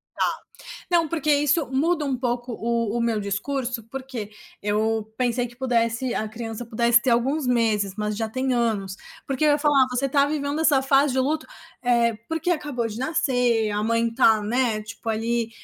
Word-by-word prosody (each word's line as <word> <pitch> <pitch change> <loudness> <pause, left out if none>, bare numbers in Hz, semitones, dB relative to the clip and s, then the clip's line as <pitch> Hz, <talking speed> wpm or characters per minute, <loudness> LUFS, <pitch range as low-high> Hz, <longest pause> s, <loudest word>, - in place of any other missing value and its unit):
Tá, - - +1 0.6
não, 335 -2 +3
porque 305 -1 -1
isso 290 +2 +2
muda 305 +4 +1
um 275 -2 -1
pouco 245 0 -2
o 235 +1 -1
o - - 0
meu 230 -2 0
discurso, 240 +4 -3
porque 255 -3 -7 0.3
eu 215 +1 0
pensei 245 -1 0
que 240 0 -15
pudesse 240 -1 0
a 215 - -2
criança 225 +1 -6
pudesse 235 +1 +3
ter 255 - 0
alguns 260 +5 +1
meses, 220 -5 +1
mas 210 -1 -2
já 225 0 -2
tem 260 +3 -1
anos, 215 -6 -1 0.3
porque 275 +2 -1
eu 300 - +5
ia 290 - +3
falar: 285 -3 +4
"Você 250 +2 0
tá 280 +1 +3
vivendo 290 0 -2
essa 290 -4 +4
fase 270 +1 +3
de 260 - -1
luto, 305 +4 -1 0.4
eh, 235 -2 +2
porque 325 +2 -1
acabou 290 -8 -1
de 220 0 -6
nascer, 245 -5 +1
a 205 0 -1
mãe 230 +1 +1
tá, 225 -3 +4
né, 225 0 0
tipo 215 +2 -9
ali, 225 +1 -1
240 Hz, 185 wpm, -24 LUFS, 225-275 Hz, 0.6 s, eu